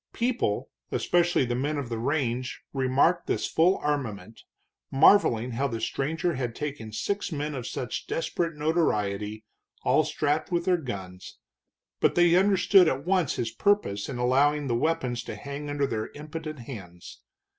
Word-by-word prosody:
People, 235 - -1 0.2
especially 175 -5 +2
the 120 - -2
men 145 +5 -1
of 140 -3 -3
the 115 -1 -3
range, 130 -1 -2
remarked 135 +6 +2
this - - 0
full 175 +4 +3
armament, 115 -8 -3 0.5
marveling 135 - +4
how 135 +4 0
the 115 -4 -4
stranger 145 +9 -1
had 125 -4 -3
taken 140 -7 -5
six 200 - -2
men 150 0 -3
of 125 -3 -5
such 125 - -4
desperate 165 0 -2
notoriety 110 - 0 0.4
all - - +4
strapped 150 +5 -1
with 170 -1 0
their 180 -1 +3
guns, 95 - -7 0.6
but - - +2
they 175 -1 +5
understood 195 -1 +5
at 135 0 -1
once 180 -5 +1
his 115 -1 -2
purpose 115 - +1
in 130 - -4
allowing 140 +4 +2
the 125 - -1
weapons 125 -3 0
to - - -6
hang 140 +1 -6
under 145 -1 0
their 110 -5 -3
impotent 155 +1 -6
hands. 90 - -10
140 Hz, 155 wpm, -27 LUFS, 115-165 Hz, 0.6 s, they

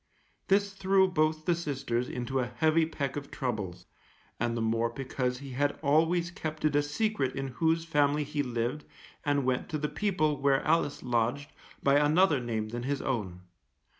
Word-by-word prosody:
This 200 0 +2
threw 190 0 +3
both 155 -3 0
the 175 - +3
sisters 135 -7 -2
into 130 +2 -2
a 125 - 0
heavy 160 0 +3
peck 140 -4 -3
of 145 -1 -5
troubles, 100 -9 -4 0.5
and 120 0 0
the - - -1
more 115 +1 +1
because 125 0 -2
he 135 +1 -9
had 145 +3 0
always 165 +4 +2
kept 155 -4 -4
it 150 -1 +2
a 145 - +5
secret 145 - -1
in 135 0 -3
whose 165 +5 +1
family 150 -2 +2
he 145 0 -2
lived 125 +3 -2 0.4
and 145 -3 +1
went 130 +4 0
to 155 - -1
the 150 0 -1
people 155 -8 0
where 135 -1 +2
Alice 155 -2 +1
lodged 125 +3 0 0.3
by 140 +1 +5
another 155 +1 +4
name 110 -3 -3
than 120 +2 -4
his 135 +2 -2
own. 100 -9 -2
145 Hz, 175 wpm, -29 LUFS, 125-155 Hz, 0.5 s, a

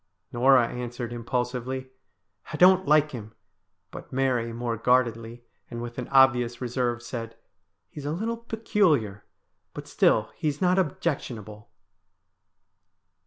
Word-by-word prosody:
Norah 125 0 +5
answered 120 -1 -6
im 120 -1 -7
pulsively, 125 +1 -3 0.3
' 95 +2 -20
I 155 - -4
don't 185 +2 +5
like 150 0 +4
him 110 -4 -9 0.2
'; 90 -1 -52
but - - -10
Mary 130 -3 0
more 120 0 -3
guardedly, 120 0 0 0.3
and 120 - -6
with 120 +1 -6
an 125 - -5
obvious 125 -3 +3
reserve, 120 -1 -2
said, 115 -2 -7 0.3
' - - -53
He's 145 -1 -7
a - - -1
little 225 +8 -2
peculiar, 190 - 0 0.5
but - - -8
still 105 -1 +2
he 160 - -4
is 145 -1 -2
not 185 0 +3
objectionable.' 120 - -3
125 Hz, 140 wpm, -26 LUFS, 115-140 Hz, 0.5 s, Norah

